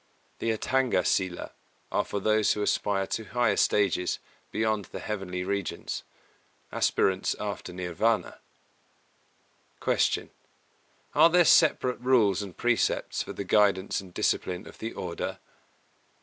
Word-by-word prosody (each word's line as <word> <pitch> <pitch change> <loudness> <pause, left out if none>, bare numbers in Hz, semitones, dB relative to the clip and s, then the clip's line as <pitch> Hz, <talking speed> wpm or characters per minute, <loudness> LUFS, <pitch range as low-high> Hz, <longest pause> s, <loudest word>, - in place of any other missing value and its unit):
The 115 - -1
Atthanga 120 -2 +1
Sīla 90 -1 -1 0.4
are - - +1
for 100 - -4
those 110 +1 +3
who 105 - -2
aspire 100 -1 0
to 110 - -3
higher 120 +2 +1
stages 95 -3 +2 0.3
beyond 110 -2 0
the - - -8
heavenly 95 -4 -4
regions, 100 -1 -3 0.7
aspirants 95 -1 +1
after 100 -3 -5
Nirvāna. 90 +5 -1 1.4
259. - - 0 0.3
Q. - - -33 0.8
_Are 170 - +6
there 175 0 +5
separate 130 -7 +4
Rules 120 -6 +3
and 95 -4 -8
Precepts 120 -1 0
for - - -6
the - - -4
guidance 100 -1 +2
and 95 -2 -13
discipline 90 +2 -1
of - - -13
the 115 - -4
Order? - - -4
105 Hz, 125 wpm, -28 LUFS, 95-115 Hz, 1.4 s, Are